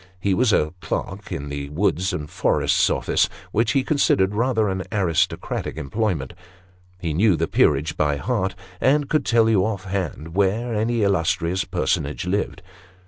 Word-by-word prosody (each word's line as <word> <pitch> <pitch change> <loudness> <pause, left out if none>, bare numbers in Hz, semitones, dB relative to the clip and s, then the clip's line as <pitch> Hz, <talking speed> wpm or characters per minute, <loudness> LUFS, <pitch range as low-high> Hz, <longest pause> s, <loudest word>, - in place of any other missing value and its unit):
He 95 +1 +1
was 120 +3 +3
a 75 -4 +2
clerk - - -4
in 70 +1 -4
the 70 0 -5
Woods 95 +3 0
and 75 -5 -4
Forests - - +2
Office, - - +1 0.2
which 115 +3 +1
he 135 -2 +2
considered 100 -10 +2
rather 110 -1 +1
an 95 -1 -2
aristo 95 -7 +1
cratic - - -5
employment; 85 - -2 0.7
he 85 -3 -2
knew 95 +4 +4
the 80 +1 -1
peerage 75 +2 +2
by 75 -1 +1
heart, 95 - -1 0.2
and 145 +1 +2
could 155 - +1
tell 115 -2 +4
you, 105 -4 +3
off 100 -3 -2
hand, 90 -5 -4
where 105 +5 +1
any 110 +1 0
illustrious 90 -1 +1
personage 70 +2 -1
lived. 95 0 -2
95 Hz, 160 wpm, -22 LUFS, 80-110 Hz, 0.7 s, knew